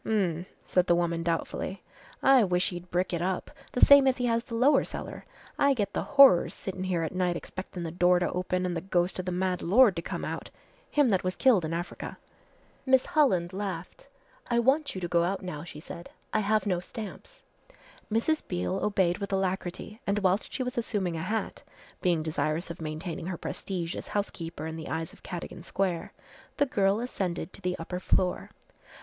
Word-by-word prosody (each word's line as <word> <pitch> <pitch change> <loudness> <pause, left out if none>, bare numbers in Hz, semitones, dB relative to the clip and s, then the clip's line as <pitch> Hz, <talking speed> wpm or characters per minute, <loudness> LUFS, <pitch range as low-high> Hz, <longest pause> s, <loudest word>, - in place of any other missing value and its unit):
"H'm," 185 -5 0 0.2
said 180 0 +2
the 175 - +5
woman 170 -1 0
doubtfully, 170 +2 -2 0.4
"I 270 -3 +7
wish 180 -2 +1
he'd 175 0 -8
brick 180 +1 0
it 170 - -1
up 185 +1 -2 0.2
the 250 - +7
same 280 -1 +8
as 260 - +3
he 245 - 0
has 230 -1 +1
the 240 -3 -6
lower 260 +6 +5
cellar - - -7 0.3
I 280 -1 +4
get 205 -4 -1
the - - 0
horrors 275 -10 +6
sittin' 190 -1 -5
here 175 -3 0
at 160 - -3
night 180 -2 0
expectin' 185 -1 -7
the 165 - -4
door 180 +1 +4
to 175 - 0
open 185 0 -1
an' 180 - -1
the 165 - -2
ghost 180 0 0
of 185 - -3
the 180 - -2
mad 180 0 0
lord 210 +2 +5
to 170 - -2
come - - -4
out - - -5 0.4
him 290 -4 +3
that 190 -4 +2
was 185 0 -1
killed 235 -9 +4
in 155 - -3
Africa." 175 +1 -5 0.7
Miss 260 -1 +4
Holland 220 - +2
laughed. 195 0 -5 0.4
"I 235 - +2
want 270 +4 +2
you 185 - -4
to 175 - -1
go 170 0 +3
out 190 +3 -1
now," 160 -5 -5
she 160 -3 -9
said, 170 +2 -9 0.2
"I 215 - +3
have 215 -1 +1
no 185 -4 +1
stamps." 225 - -9 0.7
Mrs. 265 +8 +1
Beale 90 0 -1
obeyed 190 -3 +2
with 200 0 -4
alacrity 190 +3 -2
and 200 - +1
whilst 195 0 +1
she 260 - -2
was 250 -1 -2
assuming 195 -7 -1
a 160 - -3
hat 215 +6 -3 0.4
being 170 -3 +2
desirous 160 +2 -1
of 170 - -9
maintaining 160 +3 -4
her 185 -2 -3
prestige 175 -1 -4
as - - -6
housekeeper 165 -6 -3
in 160 0 -5
the 160 - -7
eyes 160 0 -3
of - - -18
Cadogan 175 -1 -7
Square, 180 -1 -2 0.5
the 285 - +4
girl 200 -5 +2
ascended 190 -8 -3
to - - -12
the 180 -1 -1
upper 180 +2 -5
floor. 180 0 +1
185 Hz, 200 wpm, -28 LUFS, 175-215 Hz, 0.7 s, same